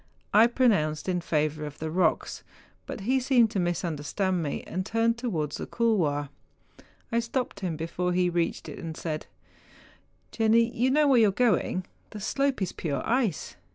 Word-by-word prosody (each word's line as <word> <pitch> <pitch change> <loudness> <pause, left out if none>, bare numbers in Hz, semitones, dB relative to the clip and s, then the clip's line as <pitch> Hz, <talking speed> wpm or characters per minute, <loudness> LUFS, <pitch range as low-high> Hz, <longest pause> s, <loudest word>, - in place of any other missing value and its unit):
I 220 +3 +7
pronounced 200 - +1
in 180 -1 0
favour 155 -2 -1
of 150 -1 -7
the 160 0 -4
rocks; 170 -1 0 0.5
but - - -6
he 255 +6 +2
seemed 245 -4 +3
to 205 - -1
misunderstand 175 +2 -1
54 - - -1
MOUNTAIN 150 -3 -2
ADVENTUEES. - - -11
me, - - -10
and 185 - -1
turned 230 +1 +1
towards 160 - -2
the - - -6
couloir. 165 -12 +1 0.8
I 235 - +2
stopped 235 -2 -3
him 180 -5 -2
before 170 +3 -2
he 180 0 +2
reached 170 -1 -1
it, - - -8
and 160 -1 -6
said, 155 -2 -4 0.5
' - - -29
Jenni, 230 +1 +3
you 250 +3 +2
know 295 +2 +4
where 265 -3 +5
you 220 -2 +5
are - - 0
going, 205 -4 +1 0.2
the 215 - -8
slope 275 +1 0
is 180 - -2
pure 140 -5 -3
ice 230 - 0
190 Hz, 190 wpm, -27 LUFS, 160-230 Hz, 0.8 s, I